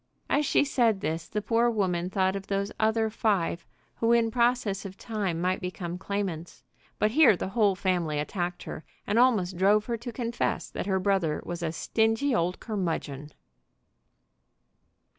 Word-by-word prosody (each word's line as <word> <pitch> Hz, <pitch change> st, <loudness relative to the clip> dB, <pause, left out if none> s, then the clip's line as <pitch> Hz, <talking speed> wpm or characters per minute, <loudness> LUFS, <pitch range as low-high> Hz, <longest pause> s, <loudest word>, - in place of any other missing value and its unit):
As 295 Hz, 0 st, +2 dB
she -, -, +3 dB
said 235 Hz, -7 st, +2 dB
this 160 Hz, +1 st, -3 dB
the 210 Hz, -, -3 dB
poor 230 Hz, +2 st, +2 dB
woman 180 Hz, -5 st, 0 dB
thought 190 Hz, 0 st, +1 dB
of 195 Hz, 0 st, -6 dB
those 200 Hz, +1 st, -1 dB
other 220 Hz, 0 st, +2 dB
five 195 Hz, -6 st, 0 dB, 0.3 s
who 230 Hz, 0 st, +2 dB
in 230 Hz, -1 st, +3 dB
process 235 Hz, -4 st, +1 dB
of 195 Hz, -1 st, -8 dB
time 200 Hz, -7 st, -3 dB
might 185 Hz, +2 st, 0 dB
become 180 Hz, -1 st, -5 dB
claimants. 190 Hz, -4 st, -4 dB, 0.3 s
But 215 Hz, -, +2 dB
here 260 Hz, -, +6 dB
the 190 Hz, -, -3 dB
whole 205 Hz, -2 st, +2 dB
family 180 Hz, -5 st, 0 dB
attacked 175 Hz, +4 st, -3 dB
her, 155 Hz, -, -7 dB, 0.2 s
and 210 Hz, +3 st, +1 dB
almost 205 Hz, -8 st, +3 dB
drove 205 Hz, +3 st, +4 dB
her 235 Hz, -1 st, -2 dB
to 240 Hz, +2 st, -7 dB
confess 235 Hz, 0 st, -2 dB
that -, -, -4 dB
her 190 Hz, -1 st, +1 dB
brother 185 Hz, -5 st, +1 dB
was 175 Hz, 0 st, -5 dB
a 165 Hz, -2 st, -1 dB
stingy 225 Hz, -, +1 dB
old 180 Hz, -4 st, 0 dB
curmudgeon. 160 Hz, -, -3 dB
200 Hz, 160 wpm, -27 LUFS, 180-225 Hz, 0.3 s, here